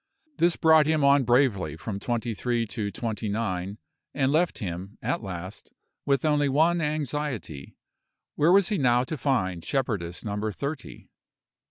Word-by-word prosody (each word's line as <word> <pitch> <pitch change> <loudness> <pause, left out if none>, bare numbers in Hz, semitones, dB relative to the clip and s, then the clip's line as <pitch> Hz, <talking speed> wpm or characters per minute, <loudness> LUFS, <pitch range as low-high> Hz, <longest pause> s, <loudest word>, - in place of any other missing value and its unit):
This 170 0 +4
brought 160 -2 +5
him 155 -2 +2
on 140 -1 +5
bravely 120 - +2
from 100 +3 -5
twenty 120 +1 -2
three 120 +1 -1
to 105 -1 -4
twenty 110 +1 -4
nine, 100 -2 -2 0.4
and 135 -1 +2
left 170 +3 +1
him, 95 -1 -6
at 125 +4 -2
last, 95 -1 -7 0.4
with 140 +2 +2
only 145 -2 +2
one 165 +5 +3
anxiety 145 - -3 0.6
where 155 +4 +3
was 195 -1 +5
he 210 - 0
now 125 -2 +3
to 155 - -4
find 95 - -1
shepherdess 100 -11 -2
number 105 +1 -2
thirty? 140 +4 -6
125 Hz, 150 wpm, -26 LUFS, 100-150 Hz, 0.6 s, brought